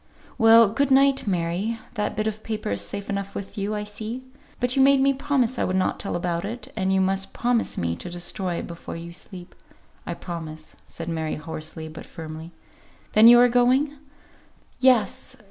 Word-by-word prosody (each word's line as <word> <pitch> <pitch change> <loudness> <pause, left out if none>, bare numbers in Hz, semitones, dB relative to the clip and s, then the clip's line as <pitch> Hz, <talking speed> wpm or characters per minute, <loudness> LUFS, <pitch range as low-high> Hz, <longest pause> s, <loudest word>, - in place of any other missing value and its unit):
"Well, 225 -1 +7
good 280 +6 +1
night, 270 -2 +4
Mary. 185 +5 -1 0.2
That 210 0 -2
bit 215 0 -1
of 215 0 -3
paper 220 - -4
is 100 0 -1
safe 200 - -5
enough 200 0 -4
with 195 - -6
you, 205 +1 -2
I 210 - -2
see. 215 +4 -6 0.4
But 245 0 0
you 270 - +4
made 275 0 +6
me 275 +1 +4
promise 265 -3 0
I - - +2
would 185 - 0
not 185 - 0
tell 195 - -2
about 175 -1 -1
it, 220 +2 -6
and 190 -3 0
you 190 - +3
must 195 +1 0
promise 245 -1 0
me 85 -1 -1
to 180 - -7
destroy 175 +1 -3
it - - -4
before 170 -1 -8
you 170 +1 -8
sleep." 180 0 -10 0.5
"I - - -3
promise," 160 -3 -7
said 165 - -6
Mary, 160 -2 -2
hoarsely, 160 +1 -7
but 155 0 -10
firmly. 160 +1 -8 0.6
"Then 215 +2 +8
you 240 +1 +10
are 245 - +7
going?" 250 +4 +3 0.9
"Yes. 255 +1 +2
205 Hz, 190 wpm, -24 LUFS, 170-245 Hz, 0.9 s, you